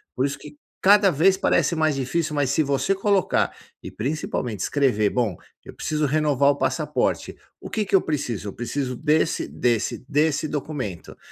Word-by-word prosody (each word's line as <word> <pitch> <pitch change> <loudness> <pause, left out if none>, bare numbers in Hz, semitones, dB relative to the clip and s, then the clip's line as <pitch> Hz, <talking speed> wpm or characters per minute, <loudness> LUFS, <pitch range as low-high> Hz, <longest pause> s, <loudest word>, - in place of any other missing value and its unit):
Por 130 - +1
isso 140 +1 -3
que 150 +1 -12 0.2
cada 200 0 +6
vez 180 +6 +4
parece 175 - +1
mais 155 -1 +2
difícil 150 +4 -1
mas 140 -3 +1
se 155 - +2
você 140 +7 0
colocar, 195 -1 +1 0.3
e - - -7
principalmente 125 -4 -3
escrever 120 -7 +2
bom, 115 -6 -1 0.3
eu - - -10
preciso 155 -1 -1
renovar 145 -1 +3
o - - -2
passaporte, - - -1 0.2
"O - - -9
que 215 - -1
que - - -10
eu 190 - +6
preciso?". 125 -9 -3
Eu - - -8
preciso 125 +2 -3
desse, 155 +4 +1
desse, 120 -3 0
desse 150 +1 +1
documento. 140 - -5
145 Hz, 170 wpm, -23 LUFS, 130-155 Hz, 0.3 s, cada